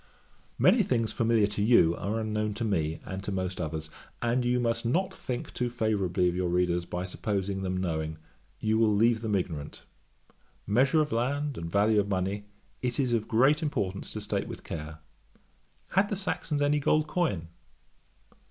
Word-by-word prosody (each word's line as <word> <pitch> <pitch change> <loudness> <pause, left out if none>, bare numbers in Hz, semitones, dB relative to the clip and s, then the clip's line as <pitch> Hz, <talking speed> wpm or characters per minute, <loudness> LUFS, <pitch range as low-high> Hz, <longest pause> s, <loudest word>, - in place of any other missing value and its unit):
Many 235 - +5
things 115 - 0
familiar 115 -2 +3
to 100 0 -2
you, 100 -7 +5
are 105 +6 -2
unknown 105 -1 -1
to 115 +2 -2
me, 80 -7 -1
and 95 +1 -5
to 105 - -3
most 95 -1 -2
others; 80 -1 -4 0.3
and 120 +1 +1
you 125 0 +2
must 115 -1 0
not 170 +11 0
think 125 -1 -5
too 125 -1 -1
favourably 100 -7 +1
of 90 - +1
your 90 -1 0
readers: 90 0 +1
by 90 +1 -4
supposing 95 +1 -2
them 95 -1 -2
knowing, 80 -3 -2 0.4
you 110 0 +1
will 115 -1 +4
leave 115 +2 +3
them 110 -3 0
ignorant. 80 -6 -4 0.8
Measure 135 +9 +3
of 150 -1 -1
land, 140 +5 0
and 85 -3 -5
value 105 +1 +4
of 100 0 0
money, 95 +2 -1 0.4
it 125 0 -1
is 130 -3 +1
of 115 -2 0
great 135 +7 +4
importance 100 - -2
to 110 - -4
state 105 - -2
with - - -8
care. 80 0 -7 0.9
Had 195 +2 +2
the 205 - -1
Saxons 155 -6 -1
any 145 +1 +3
gold 155 +2 +2
coin? 130 - -1
105 Hz, 175 wpm, -29 LUFS, 90-125 Hz, 0.9 s, Many